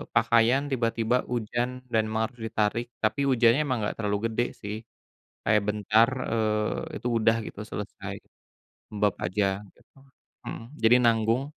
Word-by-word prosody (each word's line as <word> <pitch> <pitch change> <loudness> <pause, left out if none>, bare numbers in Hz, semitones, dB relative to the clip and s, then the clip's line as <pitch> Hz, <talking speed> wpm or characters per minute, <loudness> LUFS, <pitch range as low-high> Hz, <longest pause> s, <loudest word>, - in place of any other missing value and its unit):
pakaian 120 +4 +4
tiba-tiba 115 -1 +1 0.2
hujanm 120 +2 -1 0.2
dan 110 - +4
memang 110 0 0
harus 120 -2 -16
ditarik. 110 +2 0 0.2
Tapi 110 +6 +1
hujannya 120 +2 +4
enggak 115 -6 -1
terlalu 105 -2 0
gede 120 +2 +1 0.2
sih, 105 0 -4 0.7
kayak 105 -1 +3
bentar, 110 +2 +3 0.2
eee, 110 -1 -1
itu 120 - -1
udah 115 +1 +3
gitu 105 - -8
selesai 105 - -6 0.8
lembab 105 -1 +1
aja 100 +3 0 0.3
gitu. - - -27 0.6
Mhm, - - -5 0.2
jadi 115 +2 +7
nanggung. 115 +3 +3
115 Hz, 135 wpm, -27 LUFS, 105-120 Hz, 0.8 s, jadi